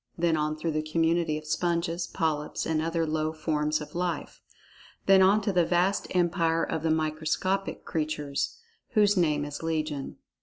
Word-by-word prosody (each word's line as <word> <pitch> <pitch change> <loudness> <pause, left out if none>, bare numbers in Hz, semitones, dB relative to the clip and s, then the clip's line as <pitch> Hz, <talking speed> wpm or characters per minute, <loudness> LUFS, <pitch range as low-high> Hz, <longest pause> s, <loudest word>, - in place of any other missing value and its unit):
Then 170 -1 +2
on 155 0 0
through 160 +1 -2
the 155 0 0
community 165 0 +1
of 155 - -8
sponges, 170 +2 -1
polyps, 155 -4 -2
and 160 -1 0
other 165 0 0
low 155 0 -1
forms 155 -1 -1
of 150 - -9
life. 175 -3 -3 0.6
Then 195 -1 +6
on 200 +3 +5
to 200 -1 -1
the 175 -1 +4
vast 180 +4 +1
empire 165 -2 +2
of 160 - -2
the 160 - 0
microscopic 160 +5 -1
creatures, 150 -3 -2 0.4
whose 210 -2 +4
name 150 -5 +2
is 145 -1 -6
legion. 155 -3 -3
160 Hz, 160 wpm, -28 LUFS, 155-175 Hz, 0.6 s, Then